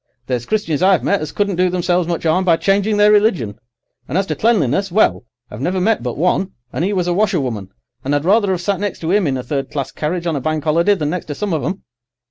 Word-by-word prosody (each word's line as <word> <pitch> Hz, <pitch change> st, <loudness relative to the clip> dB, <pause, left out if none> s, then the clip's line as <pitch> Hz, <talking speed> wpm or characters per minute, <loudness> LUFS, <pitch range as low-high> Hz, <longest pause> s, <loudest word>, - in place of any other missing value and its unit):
There's 125 Hz, -2 st, -3 dB
Christians 205 Hz, -9 st, -1 dB
I've 190 Hz, 0 st, +4 dB
met 200 Hz, -, +1 dB
as 155 Hz, -2 st, -4 dB
couldn't 200 Hz, -3 st, -1 dB
do 180 Hz, 0 st, +3 dB
themselves 175 Hz, -1 st, 0 dB
much 170 Hz, -1 st, -3 dB
'arm 165 Hz, +4 st, +2 dB
by 170 Hz, -3 st, +3 dB
changing 200 Hz, +3 st, +1 dB
their 210 Hz, 0 st, +5 dB
religion; 190 Hz, -, +2 dB, 0.5 s
and 150 Hz, -, -2 dB
as 195 Hz, -, +1 dB
to -, -, -3 dB
cleanliness, 195 Hz, -, +1 dB
well, 205 Hz, -, +2 dB, 0.3 s
I've 105 Hz, -, -8 dB
never 185 Hz, +6 st, 0 dB
met 215 Hz, +4 st, +1 dB
but 120 Hz, -1 st, -4 dB
one, 180 Hz, +4 st, 0 dB, 0.2 s
and -, -, -1 dB
'e 195 Hz, -, 0 dB
was 180 Hz, -3 st, 0 dB
a 175 Hz, -, 0 dB
washerwoman, 140 Hz, -, -1 dB, 0.3 s
and 140 Hz, +2 st, 0 dB
I'd 145 Hz, +2 st, -1 dB
rather 200 Hz, +1 st, +3 dB
'ave 180 Hz, -2 st, -2 dB
sat 195 Hz, -1 st, 0 dB
next 205 Hz, -2 st, -3 dB
to 165 Hz, +2 st, -1 dB
'im 200 Hz, -5 st, +2 dB
in 135 Hz, -2 st, 0 dB
a 125 Hz, -, -5 dB
third 135 Hz, +1 st, -3 dB
class 140 Hz, -3 st, -4 dB
carriage 170 Hz, +3 st, -3 dB
on 165 Hz, -2 st, 0 dB
a 140 Hz, -, -2 dB
Bank 155 Hz, +2 st, -2 dB
'Oliday 170 Hz, +6 st, +3 dB
than 150 Hz, -5 st, -2 dB
next 180 Hz, 0 st, -3 dB
to 145 Hz, -, -4 dB
some 200 Hz, +3 st, -2 dB
of 155 Hz, -, -1 dB
'em. 190 Hz, -, -3 dB
175 Hz, 255 wpm, -18 LUFS, 150-195 Hz, 0.5 s, their